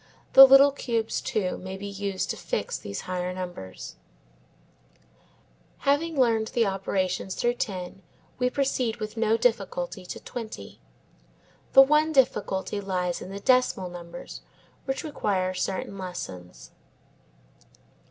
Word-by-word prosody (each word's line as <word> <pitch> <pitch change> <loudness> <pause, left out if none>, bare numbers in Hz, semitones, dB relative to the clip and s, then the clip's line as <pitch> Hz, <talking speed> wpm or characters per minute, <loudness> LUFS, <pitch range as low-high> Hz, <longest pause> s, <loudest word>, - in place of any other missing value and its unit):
The 270 0 +12
little 275 +1 +8
cubes, 230 -5 -2
too, 215 -8 -2
may 190 +1 -7
be 200 - -8
used 200 -1 -3
to - - -4
fix - - -3
these 100 - -5
higher 180 0 -3
numbers 180 - -7 1.9
Having 290 +2 +1
learned 225 -3 +3
the 235 -2 +3
operations 190 -1 -2
through 240 0 +1
ten, 190 -5 -5 0.4
we 250 0 +2
proceed 255 -4 0
with 215 -1 -6
no 225 0 +2
difficulty 195 -6 -1
to - - -6
twenty. 215 - -8 0.9
The 270 - +10
one 300 +3 +3
difficulty 210 -7 +1
lies 180 -3 -2
in - - -8
the 195 +1 -6
decimal 250 -6 +2
numbers 175 +7 -9 0.4
which 270 -1 -2
require 195 - -1
certain 190 +1 -3
lessons. 90 - -8
200 Hz, 125 wpm, -26 LUFS, 185-250 Hz, 1.9 s, The